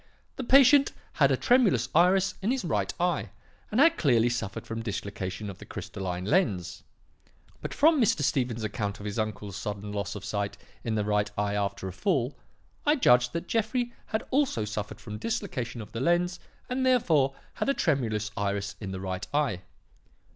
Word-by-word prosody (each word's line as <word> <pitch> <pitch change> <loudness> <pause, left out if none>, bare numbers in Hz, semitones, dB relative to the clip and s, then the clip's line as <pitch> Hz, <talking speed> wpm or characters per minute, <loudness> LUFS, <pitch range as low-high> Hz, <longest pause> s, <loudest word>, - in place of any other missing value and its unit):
The 265 - -3
patient 275 +2 +6 0.2
had - - +4
a - - +2
tremulous 205 - +3
iris 185 +3 +4
in 200 - 0
his 260 -5 0
right 160 - 0
eye 175 -2 0 0.4
and 215 - 0
had 330 +3 +5
clearly 120 -5 +4
suffered 115 -5 -3
from 115 0 -4
dislocation 100 -2 -4
of 95 -2 -8
the - - -10
crystalline 90 -1 -5
lens. 105 - 0 0.8
But - - -5
from 310 -1 +4
Mr. 195 -9 +2
Stephen's 125 -5 0
account 105 -2 -3
of 105 - -8
his 105 +2 -3
uncle's 105 -2 -3
sudden 105 0 -5
loss 100 -1 -3
of 100 -1 -7
sight 100 -1 -2 0.3
in 115 -2 -1
the 105 -1 0
right 105 0 +1
eye 100 0 0
after 100 -2 -2
a 95 - -6
fall, 140 - 0 0.5
I 295 0 +4
judged 125 - +4
that 170 +1 -3
Jeffrey 235 +2 0
had 220 - -2
also 260 - +1
suffered 105 -1 -5
from 105 -2 -7
dislocation 150 - -3
of 105 - -10
the 115 - -4
lens 175 +3 +1 0.3
and 255 +1 -1
therefore 160 - +3 0.2
had - - -2
a 275 - +2
tremulous 110 -8 0
iris 100 0 -2
in 100 - -4
the 95 -1 -5
right 95 0 -4
eye. 125 -12 +1
115 Hz, 180 wpm, -28 LUFS, -, 0.8 s, patient